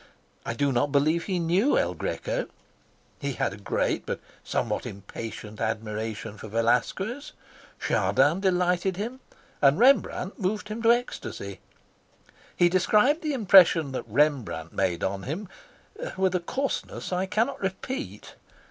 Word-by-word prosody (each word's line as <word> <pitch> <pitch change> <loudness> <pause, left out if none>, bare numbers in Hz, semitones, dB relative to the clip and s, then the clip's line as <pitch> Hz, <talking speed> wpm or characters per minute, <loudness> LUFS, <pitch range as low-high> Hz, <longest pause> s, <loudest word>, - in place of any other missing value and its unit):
I 115 - -2
do 140 +3 +1
not 135 +3 +1
believe 155 +4 +2
he 190 -3 -1
knew 180 - +2
El - - +1
Greco. - - -3 0.7
He 140 -1 -2
had 95 - -1
a - - -9
great 100 - -1
but - - -4 0.2
somewhat - - -2
impatient 105 +2 -8
admiration 110 -1 -3
for - - -8
Velasquez. 125 - 0 0.5
Chardin 160 +6 +2
delighted 180 -1 +1
him, 235 +6 -4 0.4
and 140 0 +5
Rembrandt 230 -5 +3
moved 210 +2 -2
him 215 +2 -4
to 230 0 +6
ecstasy. 100 - -3 1.0
He 175 - +5
described 210 - +3
the 305 -2 -1
impression 180 - +6
that 130 - -5
Rembrandt 125 - +1
made 90 -3 0
on 95 0 -1
him 165 - -5 0.7
with 190 -1 +2
a 180 - +2
coarseness 260 +1 -3
I 185 +1 0
cannot 220 +7 0
repeat. 225 +9 -5
175 Hz, 135 wpm, -26 LUFS, -, 1.0 s, to